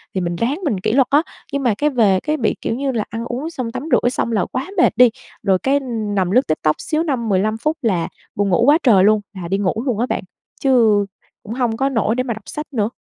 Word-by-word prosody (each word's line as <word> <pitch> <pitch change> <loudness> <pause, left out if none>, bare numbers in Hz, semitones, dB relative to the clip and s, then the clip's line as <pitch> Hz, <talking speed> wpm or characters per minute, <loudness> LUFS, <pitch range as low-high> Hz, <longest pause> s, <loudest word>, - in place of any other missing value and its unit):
thì 190 - 0
mình 175 -1 -2
ráng 250 - -1
mình 220 -10 0
kỷ 185 - -1
luật 260 +2 +3
á, 290 +2 +4 0.3
nhưng 280 0 -1
mà 240 -4 +3
cái 300 - +2
về 215 -8 +3
cái 305 0 0
bị, 225 - 0
kiểu - - -2
như 270 +2 -1
là, 225 -4 -1
ăn 225 +2 -5
uống 255 +7 -4
xong 255 -8 -5
tắm 250 - -5
rửa 245 - +3
xong 240 -2 -2
là 205 -5 +1
quá 260 +5 -3
mệt 345 - +4
đi, 250 0 +7 0.3
rồi 190 -2 +2
cái 275 +1 +2 0.4
nằm 185 -2 +1
lướt 255 +5 +3
TikTok 155 0 +1
xíu 315 0 -1
5, 255 -8 -2
15 210 +3 +1
phút 305 +7 -1
là 185 -8 0 0.3
buồn 200 0 0
ngủ 180 +4 +3
quá 290 +3 +6
trời 205 -8 +5
luôn, 215 +1 +4
là 185 -3 -6
đi 195 +3 0
ngủ 195 -3 0
luôn 240 -6 -1
á 240 - +2
bạn, - - -2 0.4
chứ 225 -6 +4 0.4
cũng 215 - -6
hông 240 -3 -1
có 270 +2 +1
nổi 225 -3 0
để 255 - 0
mà 245 -2 -2
đọc 220 -1 -11
sách 300 0 -6
nữa. 215 -3 0
230 Hz, 265 wpm, -19 LUFS, 205-265 Hz, 0.4 s, đi